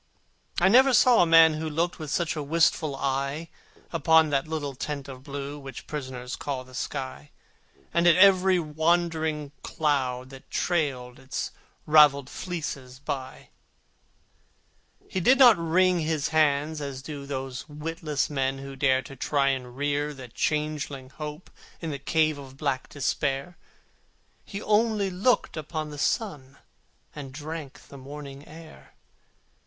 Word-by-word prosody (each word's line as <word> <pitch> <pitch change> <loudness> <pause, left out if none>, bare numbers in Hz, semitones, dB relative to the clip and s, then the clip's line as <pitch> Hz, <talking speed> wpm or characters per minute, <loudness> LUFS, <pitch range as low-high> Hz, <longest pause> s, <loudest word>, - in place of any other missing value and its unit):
I 180 - +5
never 255 +5 +6
saw 245 -1 +6
a 175 - +4
man 165 -1 +7
who 155 +1 -3
looked 170 +4 -1
With 155 -2 -6
such 170 +3 0
a 155 - -3
wistful 155 -1 +2
eye 140 +4 -2 0.4
Upon 160 -2 +4
that 140 +1 +1
little 150 -3 -3
tent 140 +1 -5
of 130 -2 -9
blue 140 +1 -6
Which 135 -1 -9
prisoners 130 -4 -5
call 135 -3 -4
the 130 0 -17
sky, 130 - -5 0.6
And 170 +1 +3
at 170 - +7
every 190 -1 +6
wandering 160 -2 0
cloud 130 -4 -1
that 135 -1 -13
trailed 135 -8 -1
Its 135 0 -4 0.3
ravelled 145 -3 +5
fleeces 140 -8 -5
by. 135 -2 -6 1.6
He 190 - -2
did 250 +9 +5
not 245 -4 +8
wring 180 +2 +3
his 155 -2 -1
hands, 155 0 +2
as 135 -2 -6
do 140 -2 -7
Those 135 0 -5
witless 150 0 -2
men 135 -2 -1
who 135 0 -8
dare 130 -1 +2
To 135 - -10
try 140 +1 +1
to 125 -1 -8
rear 145 +3 -2
the 130 -2 -10
changeling 150 -1 -2
Hope 150 +3 -8 0.3
In 165 -2 -4
the 140 - -5
cave 155 +1 +1
of 135 -1 -11
black 140 -3 -2
Despair: 140 +3 -2 0.9
He 200 - -7
only 210 -2 +2
looked 205 +8 +1
upon 155 0 -4
the 145 - -8
sun, 145 - -2 0.6
And 140 -3 -7
drank 150 0 -7
the 140 - -11
morning 140 +1 -9
air. 160 0 -14
150 Hz, 145 wpm, -26 LUFS, 135-165 Hz, 1.6 s, not